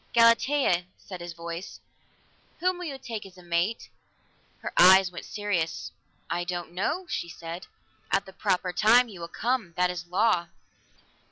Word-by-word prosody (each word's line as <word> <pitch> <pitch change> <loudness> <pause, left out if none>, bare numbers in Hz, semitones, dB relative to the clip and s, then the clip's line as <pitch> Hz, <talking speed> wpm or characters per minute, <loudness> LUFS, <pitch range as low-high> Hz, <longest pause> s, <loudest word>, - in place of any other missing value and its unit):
"Galatea," 230 -4 +4
said 185 -3 -9
his 175 0 -6
voice, 170 +2 -7 0.8
"Whom 365 +1 +1
will 360 - -5
you 280 -4 -5
take 230 -5 -6
as 190 -1 -14
mate?" 175 +4 -1 0.8
Her - - -4
eyes 190 0 +7
went 175 - -8
serious. 185 -6 -2 0.4
"I 175 - -1
don't 175 -1 -4
know," 260 - -1
she 170 - -3
said. 170 +1 -7 0.4
"At 195 - +1
the 190 - -12
proper 180 0 0
time 235 +5 +5
he 190 -5 -10
will 170 - -5
come. 225 -3 -2
That 180 0 +3
is 175 -1 -6
a - - -29
law." 185 -2 +2
185 Hz, 160 wpm, -27 LUFS, 175-230 Hz, 0.8 s, eyes